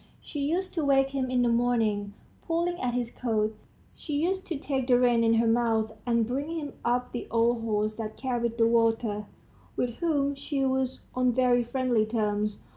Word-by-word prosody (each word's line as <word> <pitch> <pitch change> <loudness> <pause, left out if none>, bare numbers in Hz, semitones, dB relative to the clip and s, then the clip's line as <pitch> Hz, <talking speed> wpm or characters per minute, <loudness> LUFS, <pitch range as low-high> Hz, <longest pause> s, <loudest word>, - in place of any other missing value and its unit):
She 295 - -7
used 345 +7 -1
to 325 - -1
wake 270 -1 +3
him 265 -2 -1
in 250 -1 +2
the - - +3
morning, 225 -4 +1 0.3
pulling 345 +1 0
at 245 -1 -1
his 240 -1 -2
coat; 220 -3 -1 0.4
she 305 - -7
used 375 +6 0
to 330 - -2
take 270 -2 -2
the 250 -2 +5
reins 240 -2 +3
in 225 0 +4
her 230 +1 +3
mouth, 225 -1 +2 0.2
and 235 -1 +2
bring 285 +7 -3
him 290 -2 -6
up 245 +1 0
the 240 - -5
old 230 0 +2
horse 215 -1 -1
that 215 -1 -5
carried 235 -3 -2
the 230 - +4
water, 225 -2 +1 0.5
with 245 - 0
whom 285 -5 +1
she 275 0 -2
was 260 -1 -1
on 255 -1 +2
very 250 0 +3
friendly 240 -3 +1
terms. 210 -2 -1
245 Hz, 190 wpm, -28 LUFS, 225-275 Hz, 0.5 s, the